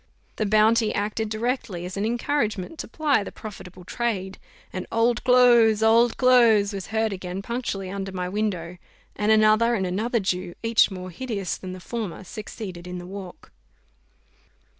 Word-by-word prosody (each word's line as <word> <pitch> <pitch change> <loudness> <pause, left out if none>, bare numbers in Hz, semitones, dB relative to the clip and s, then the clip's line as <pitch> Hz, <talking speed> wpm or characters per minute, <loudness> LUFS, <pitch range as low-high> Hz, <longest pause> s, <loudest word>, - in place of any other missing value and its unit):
The 215 - 0
bounty 215 +1 +4
acted 210 +2 -2
directly 215 -5 -2
as 180 - -6
an 200 +2 -1
encouragement 235 - -2
to - - -5
ply 295 -9 +1
the - - -7
profitable 185 -4 -10
trade, 195 -2 -3 0.3
and 185 -1 -5
"Old 235 +1 +1
clothes! 240 -4 +5
Old 230 +1 +4
clothes!" 230 -5 +5
was 195 -2 -5
heard 220 -1 0
again 185 0 -5
punctually 200 -5 -4
under 195 0 -4
my 180 -1 -3
window; 180 -3 -3 0.4
and 210 +1 +1
another 215 +2 +4
and 190 -4 -1
another 220 +6 0
Jew, 180 -3 -2
each 230 -1 +4
more 185 -2 -7
hideous 200 -1 -3
than 185 -1 -8
the 185 - -8
former, 210 -2 -5
succeeded 190 -3 -8
in 180 0 -5
the 175 - -8
walk. 190 -1 -10
210 Hz, 160 wpm, -24 LUFS, 185-230 Hz, 0.4 s, clothes